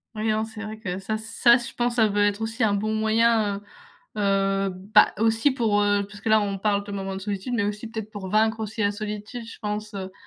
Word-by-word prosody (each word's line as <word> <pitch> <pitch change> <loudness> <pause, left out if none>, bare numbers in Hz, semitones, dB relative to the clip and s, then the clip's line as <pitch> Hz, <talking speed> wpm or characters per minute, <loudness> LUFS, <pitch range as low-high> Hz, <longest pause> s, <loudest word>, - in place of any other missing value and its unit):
Oui, 215 +1 -1
hein, 215 0 +1
c'est 220 0 -8
vrai 215 0 -6
que 185 -4 -4
ça 205 +3 -3
ça 225 +2 +4
je 240 -1 -4
pense 240 0 -1
ça 220 -2 +4
doit 205 0 +2
être 205 +1 +1
aussi 225 +1 0
un 205 - +2
bon 215 +2 -1
moyen, 220 -2 +2 0.6
heu - - 0
heu 195 0 +1
bah, 190 +3 +3
aussi 225 +5 +3
pour, 220 -5 +1
heu 205 0 +2
puisque 205 0 -14
là 220 -1 +4
on 200 -1 -2
parle 200 0 +1
de 205 - -9
moments 195 -1 -4
de 190 - -6
solitude 200 +4 -4
mais 225 -4 +1
aussi 210 +2 -3
peut-être 220 -2 -6
pour 200 -3 -6
vaincre 220 +2 +2
aussi 220 0 -4
la 200 0 +2
solitude. 210 +3 -6
Je 230 - -10
pense, 210 0 -4
heu, 190 -1 -5
215 Hz, 240 wpm, -25 LUFS, 200-220 Hz, 0.6 s, ça